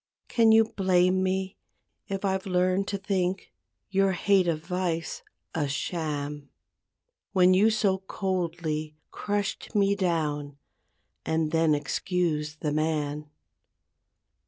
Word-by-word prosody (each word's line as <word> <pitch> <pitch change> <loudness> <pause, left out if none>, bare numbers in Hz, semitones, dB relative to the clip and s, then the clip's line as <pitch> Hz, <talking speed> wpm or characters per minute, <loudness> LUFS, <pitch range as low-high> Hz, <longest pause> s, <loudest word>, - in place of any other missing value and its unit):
Can 225 -2 +4
you 225 0 +7
blame 185 -3 +2
me 190 0 -1 0.5
if 195 0 -3
I've 190 0 -1
learned 185 +1 +1
to 200 - -2
think 190 -1 -2 0.4
Your 195 0 +3
hate 190 +1 +3
of 160 -1 -1
vice 175 -2 -2 0.3
a 150 -3 0
sham, 145 -1 -3 0.8
When 185 -1 +5
you 200 +4 +5
so 205 -3 +1
coldly 170 -5 -3 0.2
crushed 205 +2 -3
me 200 -1 +4
down 150 -6 -1 0.7
And 160 -1 0
then 160 -2 +3
excused 155 -1 -2
the 150 - -1
man? 150 -1 -1
180 Hz, 110 wpm, -27 LUFS, 155-195 Hz, 0.8 s, you